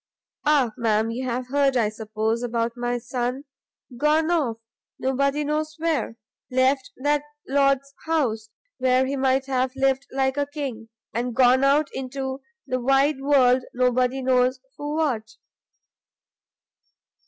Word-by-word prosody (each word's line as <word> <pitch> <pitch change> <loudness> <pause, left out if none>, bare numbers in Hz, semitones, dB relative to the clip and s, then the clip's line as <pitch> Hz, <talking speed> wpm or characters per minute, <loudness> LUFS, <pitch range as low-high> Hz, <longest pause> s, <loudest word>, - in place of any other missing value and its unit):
Ah, 280 -6 +4
ma'am, 225 -1 +1
you 255 +3 -4
have 250 +1 -3
heard, 275 -1 +2
I 220 -3 +2
suppose, 220 +1 -2
about 235 -1 -1
my 245 0 -1
son? 250 +2 -3 0.5
gone 310 +4 +2
off! 275 -10 +1 0.4
nobody 275 +3 0
knows 305 +1 -2
where! 315 -8 -1 0.3
left 260 +1 +1
that 290 +2 +1 0.3
lord's 275 0 +2
house, 235 -10 0 0.3
where 255 0 +3
he 275 +2 -2
might 265 0 +1
have 260 -1 -1
lived 270 0 +1
like 265 0 0
a 285 0 0
king, 270 -7 -6 0.2
and 240 +1 -2
gone 255 +1 +5
out 285 +2 +3
into 265 +1 -4 0.2
the 255 - -1
wide 270 +2 +2
world 260 -3 +4
nobody 250 +1 +1
knows 255 0 +2 0.2
for 295 +2 -4
what!" 240 -9 -1
260 Hz, 130 wpm, -24 LUFS, 245-280 Hz, 0.5 s, gone